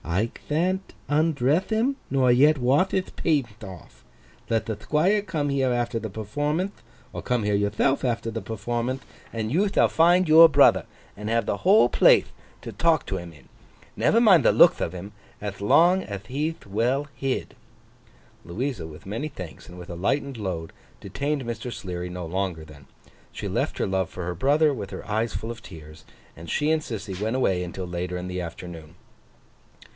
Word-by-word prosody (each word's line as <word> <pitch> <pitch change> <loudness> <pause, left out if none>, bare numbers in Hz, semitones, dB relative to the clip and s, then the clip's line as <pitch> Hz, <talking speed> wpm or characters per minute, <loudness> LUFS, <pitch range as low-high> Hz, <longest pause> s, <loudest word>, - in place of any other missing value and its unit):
I 95 +8 -1 0.2
thant 185 +5 -1 0.2
undreth 150 +1 +1
him, 230 +5 +1
nor 130 -2 +3
yet 145 +5 +5
wath 140 +9 +2
hith 190 -1 -2
paint 120 -9 -1
off. 90 - -12 0.5
Let 115 -1 0
the 110 -2 -3
Thquire 155 - +1
come 155 -5 -2
here 135 -2 +1
after 120 -1 -1
the 110 - -5
performanth, 145 - -3 0.3
or - - -5
come 125 -3 -1
here 105 0 +1
yourthelf 105 +7 +1
after 115 -2 -1
the - - -4
performanth, 120 +4 -3 0.3
and 110 -1 -3
you 200 +5 +2
thall - - +3
find 175 +2 +4
your 160 +1 +9
brother, - - +5 0.3
and 105 +1 -6
have 115 -1 +1
the - - -1
whole 190 - +5
plathe - - +5 0.4
to - - -6
talk - - +2
to - - -3
him 85 -1 -8
in. 75 -5 -18 0.5
Never 230 - +3
mind 195 - +6
the - - +5
lookth - - +5
of - - -1
him, 90 +3 -8 0.3
ath 100 -1 -6
long 175 - +4
ath 100 0 -7
he'th 150 +6 -3
well 120 +8 0
hid.' 135 -1 -3 0.9
Louisa, 105 - -4
with 80 +6 -12
many 115 +10 -4
thanks 90 - -10
and 90 - -11
with 90 -1 -10
a 85 - -6
lightened 135 +9 -1
load, 90 -7 -5 0.3
detained 140 +7 -3
Mr. 120 +1 -5
Sleary 90 -4 -5
no 90 -1 -6
longer 90 -2 -3
then. 70 -3 -15 0.4
She - - -6
left - - -2
her - - -1
love 95 -2 -1
for 90 - -6
her 90 0 -3
brother, 145 - +3
with 105 -6 -6
her - - -8
eyes 110 +2 -1
full 115 - -4
of 115 -2 -9
tears; 80 -5 -13 0.3
and 80 0 -10
she 150 +1 +1
and 160 -1 +2
Sissy 105 -8 -6
went 110 +3 -1
away 95 -9 +1
until 90 +1 -6
later 90 +1 -4
in 90 0 -5
the 90 0 -4
afternoon. 85 -1 -9
115 Hz, 185 wpm, -25 LUFS, 95-145 Hz, 0.9 s, your